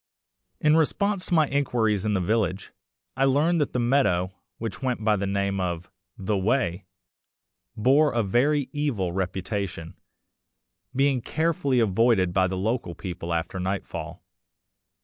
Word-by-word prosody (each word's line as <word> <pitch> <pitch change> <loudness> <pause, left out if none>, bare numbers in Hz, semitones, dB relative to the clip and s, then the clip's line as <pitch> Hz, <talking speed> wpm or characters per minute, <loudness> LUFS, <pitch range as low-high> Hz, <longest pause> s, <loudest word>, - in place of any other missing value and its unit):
In 150 0 +4
response 195 +5 +1
to 175 - +1
my 155 -2 +4
inquiries 115 -7 0
in 105 -1 +1
the - - +2
village, 100 0 -1 0.4
I 135 +1 +2
learned 150 +5 +2
that 145 - 0
the - - -2
meadow, 120 -8 +2 0.3
which 115 +1 -5
went 125 -4 -2
by 105 -1 +3
the 100 0 -2
name 100 0 -1
of 90 -1 -3 0.3
"The 100 +2 -1
Way," 100 -2 0 0.9
bore 140 +7 +4
a 115 -1 +1
very 135 +8 +2
evil 130 - -1
reputation, 95 -2 -3 1.0
being 135 -1 +2
carefully 155 -3 0
avoided 110 -3 +3
by 95 0 +3
the 95 +1 -3
local 105 -3 -2
people 85 -2 -6
after 85 +3 -2
nightfall. 85 -3 -4
110 Hz, 140 wpm, -25 LUFS, 95-135 Hz, 1.0 s, In